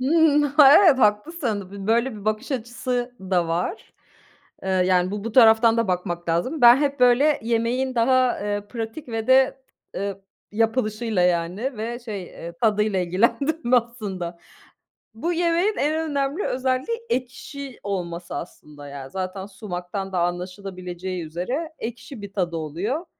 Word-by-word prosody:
Hımm, 295 +2 +4
ha, 285 -1 +6
evet, 285 -6 +6
haklısın, 210 - 0
b 200 -1 -8
böyle 235 +4 +2
bir 210 -2 -10
bakış 215 +6 -1
açısı 245 0 -3
da 185 -3 0
var. 175 - -3 0.7
Eee, 190 - -5
yani, 185 -1 +2
bu 205 0 -5
bu, 230 - -4
taraftan 225 -1 +6
da 230 -3 +1
bakmak 175 -1 -2
lazım. 175 - 0
Ben 240 0 +9
hep 280 -1 -1
böyle 250 +5 +5
yemeğin 235 +3 0
daha, 255 +1 +3
eee, 205 0 -3
pratik 230 +5 -6
ve 225 -1 -3
de, 265 +1 +4 0.3
ııı, 200 0 -4 0.3
yapılışıyla, 225 -2 0
yani, 180 +9 0
ve, 235 +2 -3
şey, 215 -5 -6
eee, 170 -1 -9
tadıyla 210 -2 +2
ilgilendim 240 - +1
aslında. 205 -8 -2 0.8
Bu 330 +11 -2
yemeğin 345 +4 +1
en 315 +2 0
önemli 280 +5 -1
özelliği 260 - -1
ekşi 260 - -5
olması 175 -3 -4
aslında. 150 -4 -9
Ya 140 -1 -8
zaten 190 +2 -4
sumaktan 190 -1 -6
da 185 - -1
anlaşılabileceği 180 0 -4
üzere 245 - -4
ekşi 235 +1 -7
bir 200 -1 -8
tadı 175 -4 -1
oluyor. 190 - -3
225 Hz, 140 wpm, -23 LUFS, 185-260 Hz, 0.8 s, Ben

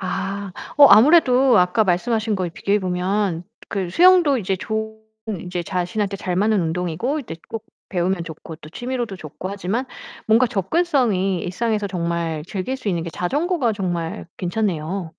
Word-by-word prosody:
아. 195 +1 -4 0.3
어 285 - +10
아무래도 260 -1 +6
아까 180 +5 +3
말씀하신 220 +4 0
거에 185 -3 -1
비교해 200 +5 0
보면 185 -1 -1 0.2
그 190 -3 -3
수영도 345 - +5
이제 190 -2 -1
좋은 220 +2 -4 0.5
이제 180 -1 -3
자신한테 195 +3 -2
잘 185 -2 -3
맞는 210 +1 +2
운동이고 180 - -2
이제 225 - -8 0.2
또 225 - -3
꼭 - - -44 0.3
배우면 175 -1 0
좋고 160 0 -9 0.2
취미로도 240 -4 -4
좋고 175 +3 -7
하지만 200 +5 -2 0.4
뭔가 225 +3 +5
접근성이 215 - +1
일상에서 210 +3 -1
정말 170 -4 -2
즐길 195 +8 -3
수 220 - -4
있는 170 -3 0
게 170 - -5
자전거가 275 - 0
정말 175 -1 -3
괜찮네요. 180 -2 -2
195 Hz, 340 characters per minute, -21 LUFS, 180-225 Hz, 0.5 s, 어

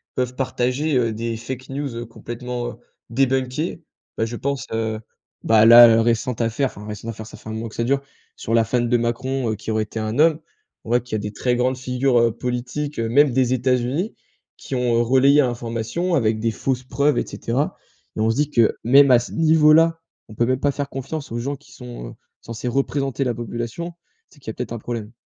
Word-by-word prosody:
peuvent 125 0 -2
partager, 135 +3 -1
heu, 115 -2 +1
des 115 +1 -3
fake 125 +3 -7
news, 140 -1 -4
heu, 120 - -5
complètement 120 +1 -6 0.3
débunkés. 135 +6 -1 0.3
Bah, - - +1
je 120 +1 -5
pense, 140 -1 -2
heu, 110 -1 -2 0.4
bah, 110 -1 +5
là 120 +1 +10
à 120 - +10
la 115 0 +5
récente 120 +1 0
affaire- 115 +4 0
enfin 105 -4 -10
récente 105 +2 -6
affaire, 110 -1 -7
ça - - -11
fait 110 - -11
1 - - -4
mois 110 +1 -4
que 110 - -12
ça 115 - -1
dure- 135 +3 +1 0.4
sur 115 - -4
la 115 0 +5
femme 120 +1 0
de 120 - +2
Macron, 120 +1 -1
heu, - - -2
qui 110 - -5
aurait 110 0 +1
été 110 +1 -6
un 110 +4 -3
homme. 160 0 +4 0.5
On - - -9
voit 120 +1 +3
qu'il 120 -1 -5
y - - +1
a - - -3
des 105 0 -5
très 125 +3 0
grandes 130 +1 +1
figures, 130 0 +1
heu, 115 0 +3
politiques, 125 +5 -4
heu, 115 - -1
même 145 +4 +4
des 125 -1 +2
États-Unis, 130 - 0 0.4
qui - - -9
ont 120 -2 +2
relayé 135 +4 +5
l'information 120 +7 -2
avec 110 -6 +1
des 115 +1 0
fausses 130 +3 -2
preuves 140 +3 +1
et - - -1
cetera 130 +6 -2 0.4
et - - -6
on 110 - +2
se 115 - +1
dit 150 +2 0
que 115 -5 +3
même 140 +3 +7
à 125 - +8
ce 120 - -7
niveau 155 -2 +5
là, 165 +1 +4 0.3
on 110 - -11
peut 120 - +2
même 130 +1 0
pas 145 +1 +1
faire 140 0 -3
confiance 140 +2 -6
aux 115 - -3
gens 140 +4 -3
qui 140 -2 -19
sont, 120 - -9
heu, - - -11 0.3
censés 115 +1 -6
représenter 135 +1 -1
la 125 -2 0
population. 120 +8 -5 0.4
C'est 145 - -21
qu'il 135 - -9
y - - -1
a - - -10
peut-être 125 +1 -6
un - - -3
problème. 115 -1 -6
125 Hz, 230 wpm, -22 LUFS, 115-135 Hz, 0.5 s, là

